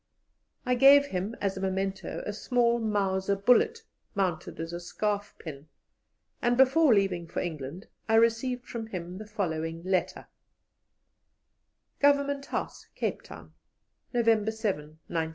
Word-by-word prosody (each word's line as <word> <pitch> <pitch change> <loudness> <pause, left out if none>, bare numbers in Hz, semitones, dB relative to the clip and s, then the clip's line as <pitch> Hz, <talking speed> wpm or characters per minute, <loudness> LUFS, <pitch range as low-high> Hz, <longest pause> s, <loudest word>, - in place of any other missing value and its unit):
I 250 - +2
gave 275 +3 +7
him 195 -2 -3
as 195 -1 -1
a - - -4
memento 190 -1 -2
a 205 - -3
small 235 +2 +1
Mauser 200 -3 0
bullet 440 - +3 0.3
mounted 185 -5 -2
as 165 +1 -5
a 175 - -4
scarf 205 +3 -3
pin, 150 -2 -9 0.7
and 240 0 +2
before 270 +3 +5
leaving 195 -5 +2
for - - -4
England 160 +2 -5 0.2
I 225 - +4
received 230 +2 +2
from 225 -2 -6
him 180 -2 -6
the 215 - -8
following 165 -5 -3
letter: 185 -1 -1 1.7
"GOVERNMENT 280 -1 +2
HOUSE, - - -4
"CAPE - - -2
TOWN, - - -12 0.6
"_November 225 -2 +3
7, 185 -9 -3
1900. 160 -1 -2
205 Hz, 135 wpm, -28 LUFS, 180-240 Hz, 1.7 s, gave